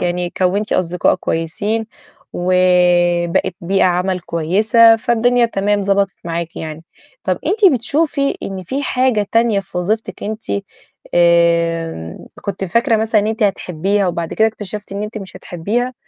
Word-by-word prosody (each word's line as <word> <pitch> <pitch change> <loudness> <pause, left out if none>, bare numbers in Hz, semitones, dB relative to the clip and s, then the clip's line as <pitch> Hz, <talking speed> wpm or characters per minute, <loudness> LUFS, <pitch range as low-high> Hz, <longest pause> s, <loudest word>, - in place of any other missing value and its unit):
يعني 175 0 -1
كوّنتِ 195 +3 0
أصدقائك 180 +1 +1
كويسين، 205 +8 -2 0.5
وبقِت 175 -1 +2
بيئة 190 +3 +1
عمل 180 +1 0
كويسة، 215 +8 +4
فالدنيا 240 +1 +2
تمام 205 -1 0
ضبطت 195 0 +1
معاكِ 170 -1 -4
يعني. 160 0 -7 0.4
طَب 185 -2 0
أنتِ 395 0 +4
بتشوفي 280 +3 0
إن 190 -1 -5
في 265 +10 -3
حاجة 250 -6 +1
تانية 230 -3 +3
في 190 -2 -7
وظيفتك 215 +5 -2
أنتِ 215 +2 -4 0.7
آمم 170 - +2 0.2
كنتِ 200 -1 -4
فاكرة 225 +5 +2
مثلًا 220 -1 +2
إن 205 - -2
أنتِ 220 0 -2
هتحبيها 195 0 0
وبعد 170 -2 -3
كده 220 0 +3
اكتشفتِ 210 -1 -8
إن 200 +1 -4
أنت 215 +1 -5
مش 190 -3 -10
هتحبيها؟ 210 +9 -3
195 Hz, 140 wpm, -17 LUFS, 175-220 Hz, 0.7 s, كويسة